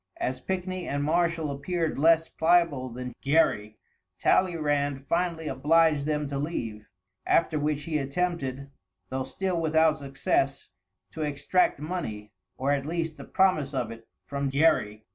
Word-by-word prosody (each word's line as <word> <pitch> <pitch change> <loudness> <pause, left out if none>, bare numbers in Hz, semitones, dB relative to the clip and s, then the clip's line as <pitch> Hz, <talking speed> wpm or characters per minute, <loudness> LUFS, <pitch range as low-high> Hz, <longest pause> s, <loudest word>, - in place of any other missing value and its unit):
As 130 0 -2
Pickney 185 0 -3
and 145 0 -1
Marshall 165 -1 +1
appeared 160 +2 -2
less 165 +1 +5
pliable 160 -6 +2
than 125 +1 -6
Gerry, 110 -8 +2 0.4
Talleyrand 145 -6 +1
finally 170 -1 -1
obliged 150 +2 +3
them 150 -1 0
to 140 -1 -3
leave, 115 -8 -4 0.4
after 160 -2 +2
which 150 0 -1
he 155 0 -1
attempted, 140 -2 -2 0.4
though 130 0 -2
still 175 +6 -2
without 160 0 +3
success, 140 0 -1 0.4
to 155 - -6
extract 150 +3 +1
money, 145 - -5 0.3
or 135 +2 0
at 140 0 0
least 165 -1 -2
the - - -9
promise 155 -8 +2
of 120 -3 -1
it, 115 0 -11 0.2
from 140 -1 -2
Gerry. 135 -8 +2
150 Hz, 140 wpm, -27 LUFS, 135-165 Hz, 0.4 s, less